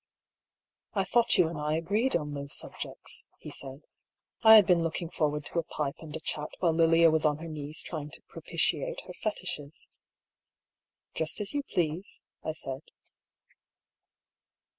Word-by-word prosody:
" - - -63 0.3
I 195 - +3
thought 235 +4 +3
you 165 - +5
and 160 -2 -5
I 150 +1 0
agreed 205 +11 +1
on 150 -3 -1
those 140 0 -4
subjects," - - -5
he - - -9
said. 135 +2 -7 0.3
" - - -54
I 220 -1 +10
had 210 -3 +9
been 175 -2 +4
looking 165 +1 -2
forward 150 -1 0
to 170 - -1
a - - -1
pipe 150 -1 -3
and 155 -2 -8
a - - -3
chat 150 -1 -3
while 170 -3 +2
Lilia 165 0 +6
was 155 0 +2
on 150 -2 +3
her 165 +2 -7
knees 155 0 -5
trying 150 -3 -5
to - - -5
propitiate - - -1
her - - -10
Fetishes." 175 -8 -4 0.6
" - - -62
Just 160 0 0
as 210 0 -2
you 290 - +1
please," 175 - -2 0.2
I 155 - -2
said. 135 -3 -5
160 Hz, 170 wpm, -30 LUFS, 150-180 Hz, 0.6 s, I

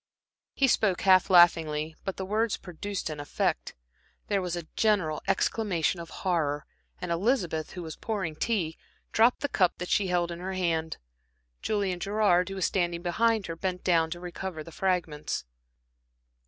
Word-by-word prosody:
He 275 - +3
spoke 205 -7 +2
half 185 -1 +5
laughingly, 160 -3 +4
but 195 - -3
the 190 - -3
words 215 +3 0
produced 195 +2 -5
an 150 - -6
effect. 145 - -2 0.5
There 200 -2 +2
was 180 -1 -2
a 170 -2 -5
general 200 -9 +2
exclamation 195 -3 +1
of 170 -1 -8
horror, 155 -6 -1 0.3
and 180 - -4
Elizabeth, 170 - 0
who 180 - -6
was 160 -1 -7
pouring 195 -8 -3
tea, 170 -4 -1 0.3
dropped 230 +3 +4
the 285 - +1
cup 185 -9 +2
that 180 - -5
she 200 - +2
held 175 -1 0
in 170 - -6
her 190 +2 -4
hand. 165 -3 -1 0.6
Julian 200 -4 -1
Gerard, 200 -2 +2
who 195 - -5
was 190 - 0
standing 175 -2 0
behind 220 +4 +2
her, 165 - -5
bent 180 +1 -3
down 165 -3 +3
to 175 +1 -5
recover 180 -2 -6
the 165 - -11
fragments. 170 - -1
180 Hz, 165 wpm, -28 LUFS, 165-195 Hz, 0.6 s, half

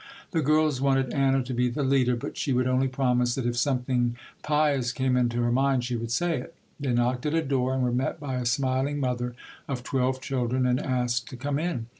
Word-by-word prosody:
The 165 -4 +1
girls 155 -2 +2
wanted 135 -2 +2
Anna 135 -1 +2
to 125 +1 -5
be 125 0 +1
the 130 +4 -2
leader, 130 -2 +3
but 120 - -6
she 135 - -1
would 125 0 +2
only 130 +1 +2
promise 125 -2 +1
that 130 - -3
if 120 0 0
something 125 -1 0 0.2
pious 145 -5 +1
came 130 -1 0
into 120 -1 +1
her 120 - +1
mind, 135 0 +2
she 125 0 -2
would 115 0 -4
say 170 +4 0
it. 165 +6 -10 0.2
They 140 -3 -1
knocked 125 +3 +1
at 150 - 0
a 165 - +2
door 130 -2 0
and 130 - 0
were 125 - +1
met 130 +6 -1
by 135 -3 -3
a 125 - -2
smiling 130 +3 0
mother 125 -2 -2 0.3
of 130 -3 -4
twelve 130 0 0
children 130 -1 -1
and 125 0 +2
asked 125 -2 -1
to 130 - -8
come 140 +2 -2
in. 155 -9 -2
130 Hz, 225 wpm, -26 LUFS, 125-140 Hz, 0.3 s, leader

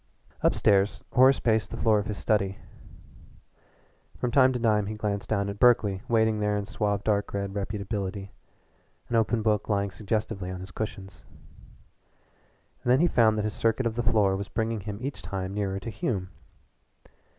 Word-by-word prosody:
Up - - +3
stairs 100 0 +2
Horace 130 +1 +6
paced 110 -2 +1
the - - -6
floor 110 -2 +3
of 105 - -4
his 105 - -4
study. 100 -3 0 1.6
From 125 - -2
time 130 0 +5
to 125 - -1
time 105 -3 +2
he 110 - -4
glanced 105 -2 -3
toward 100 -1 -1
Berkeley 105 -5 +4
waiting 110 -2 +2
there 105 0 0
in 100 - -3
suave 100 -1 -1
dark 105 -1 0
red 100 -1 -3
reputability, 100 -1 -4 0.8
an 120 - -1
open 115 0 +1
book 105 -1 +1
lying 100 -1 0
suggestively 100 -1 -3
on 95 0 -5
his 95 +1 -9
cushions. 95 -5 -6 1.6
And - - -2
then 130 - +5
he - - +5
found 110 -8 +3
that 105 - 0
his 105 - -2
circuit 115 +2 0
of 115 - 0
the 120 - -1
floor 105 -5 +2
was 100 +1 -4
bringing 115 0 -1
him 100 +1 -6
each 135 -8 -4
time 95 +1 -4
nearer 100 -1 -2
to 115 +3 -6
Hume. 100 -3 -3
105 Hz, 175 wpm, -27 LUFS, 100-110 Hz, 1.6 s, Horace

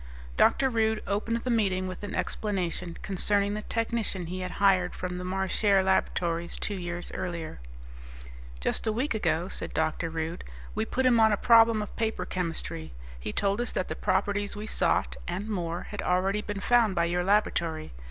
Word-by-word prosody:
Dr. 270 - +4
Rude 220 -3 +1
opened 215 +3 0
the 255 - 0
meeting 190 -5 +1
with 185 -1 -6
an 205 -1 -5
explanation 180 -4 -2
concerning 200 +1 +1
the 210 - -3
technician 225 -5 -2
he 180 +3 -5
had 185 0 -4
hired 190 -3 +3
from 180 0 -4
the - - -5
Marchare 190 +1 +2
Laboratories 170 -2 0
two 210 - -2
years 175 -2 -5
earlier. 170 - -4 1.0
"Just 60 - -1
a - - +3
week 245 +6 0
ago," 175 -5 0
said - - -5
Dr. 160 +1 0
Rude, 165 +2 -4 0.3
"we 220 +1 -1
put 260 +3 -1
him 240 -2 +5
on 220 -1 +6
a 205 - +2
problem 230 -1 +6
of 210 - -9
paper 225 -1 -1
chemistry. 165 - -3 0.3
He - - -4
told 200 - 0
us 240 - -1
that 185 - -1
the - - -2
properties 205 +1 0
we 210 +1 -5
sought - - +1
and 185 +5 -3
more 175 -5 -2
had 205 - -4
already 190 +3 +1
been 205 -1 -5
found 230 -3 +4
by 170 - +3
your 175 +1 0
laboratory. 170 -5 +1
195 Hz, 180 wpm, -28 LUFS, 175-215 Hz, 1.0 s, on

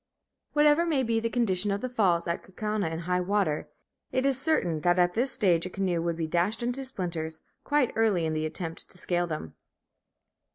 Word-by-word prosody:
Whatever 300 +2 +5
may 305 -6 +1
be 230 -1 +1
the 230 0 -1
condition 205 -5 +1
of 200 0 -1
the 255 - -2
falls 190 -9 +2
at 170 - -1
Kaukauna 210 -1 -2
in 165 +1 -4
high 180 +1 0
water, 180 -6 0 0.4
it 260 +1 0
is 270 -1 +2
certain 180 - +1
that 175 +3 +3
at 175 0 +3
this 250 +3 +2
stage 180 -4 +2
a - - -7
canoe 180 -3 -1
would 170 0 -1
be 165 - -1
dashed 175 +8 0
to 245 +3 -2
splinters 170 -9 -3 0.2
quite 290 -4 +1
early 210 -7 +2
in 160 - -1
the 155 0 -1
attempt 165 +1 -6
to - - -8
scale 175 0 0
them. 155 - -5
185 Hz, 200 wpm, -28 LUFS, 170-240 Hz, 0.4 s, Whatever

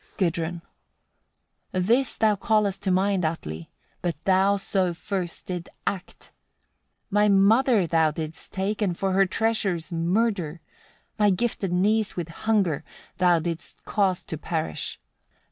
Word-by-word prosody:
Gudrun. 170 -2 -1 1.1
53. 185 - 0
"This 235 +8 +2
thou 215 -1 +3
callest 205 -1 +1
to 195 - -1
mind, 190 0 +2
Atli! 80 - -3 0.3
but 175 -3 -1
thou 195 +1 +3
so 190 -3 0
first 185 -2 -4
didst 180 -2 -5 0.2
act: 190 -2 -5 0.8
my 210 +1 +4
mother 210 +2 +4
thou 160 -1 +3
didst 155 +1 -6
take, 200 +3 -2
and 180 -5 0
for 195 -1 0
her 195 +1 +4
treasures 195 -6 0
murder; 175 -1 0 0.6
my 210 -1 +5
gifted 195 -1 0
niece 210 +4 +2
with 175 -2 -4
hunger 190 -4 0 0.4
thou 180 -2 +5
didst 165 0 -5
cause 195 -4 +1
to 160 - -6
perish. 160 -1 -3
190 Hz, 130 wpm, -25 LUFS, 170-205 Hz, 1.1 s, my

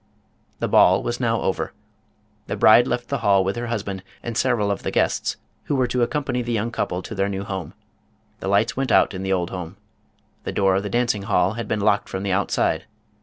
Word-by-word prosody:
The - - -1
ball 95 +2 +5
was 120 +1 -2
now 115 -2 +1
over. - - -2 0.7
The - - -2
bride 120 +3 +6
left 120 0 -2
the 140 - -1
hall 100 -4 +3
with 95 +1 -1
her 120 0 -4
husband 100 -4 -3 0.2
and 120 -1 -4
several 115 -5 +1
of 100 - -3
the - - -2
guests - - 0 0.3
who 145 - 0
were 130 -2 +2
to 125 0 -1
accompany 125 0 0
the 120 0 -4
young 115 0 -1
couple 90 -5 -2
to - - -7
their 100 -1 0
new 100 0 -3
home. 95 -6 -5 0.6
The - - -5
lights 100 +4 +2
went 135 0 -1
out - - +4
in 95 - -5
the 95 0 -2
old 90 -2 0
house. 90 -2 -6 0.7
The - - -4
door 95 -1 +3
of 95 - +1
the 105 - -4
dancing 120 -1 +1
hall 100 -1 +1
had 115 +1 -5
been 105 - -1
locked 100 0 +2
from 95 0 -4
the 100 - -1
outside. 95 0 0
105 Hz, 220 wpm, -23 LUFS, 95-120 Hz, 0.7 s, bride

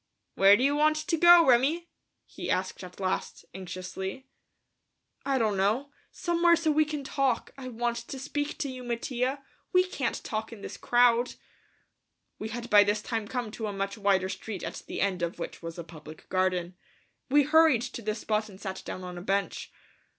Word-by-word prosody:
"Where 195 +1 +6
do 250 - 0
you 285 +1 +3
want 305 +1 +4
to 310 +2 -1
go, 345 +1 +8
Remi?" 275 +8 +3 0.4
he - - -7
asked 185 +1 -1
at 180 +1 -11
last, 190 -1 -3
anxiously. 190 +5 -6 1.0
"I 275 -1 +2
don't 215 -5 +1
know. 220 +9 +1 0.2
Somewhere 345 0 +3
so 320 -2 +1
we 310 +1 +3
can 300 -1 -4
talk. 270 -3 0
I 265 -2 -8
want 240 -1 -2
to 235 +3 -7
speak 290 +2 -3
to 285 - -2
you, 255 -1 -8
Mattia. 250 +3 -2 0.3
We 365 -1 +5
can't 370 - -3
talk 220 -1 -4
in 225 -3 -10
this - - -7
crowd." 240 0 +3 1.0
We 215 - -4
had 235 +1 -5
by 205 -1 +8
this 205 +1 0
time 225 -3 -3
come 245 -3 -3
to 220 0 -4
a 205 - -4
much 195 0 -3
wider 200 -3 +2
street 190 0 -6
at - - -5
the - - -4
end 190 -3 0
of 170 0 -2
which 170 - -6
was 165 0 -7
a 170 - -5
public 155 -1 -12
garden. 185 -1 0 0.5
We 290 +2 +5
hurried 305 -4 +5
to 245 -1 -6
this 215 0 -3
spot 215 0 -1
and 190 -1 -13
sat 190 -2 -5
down 185 - -6
on 180 -1 -6
a - - -8
bench. 195 +1 -2
230 Hz, 190 wpm, -28 LUFS, 195-275 Hz, 1.0 s, go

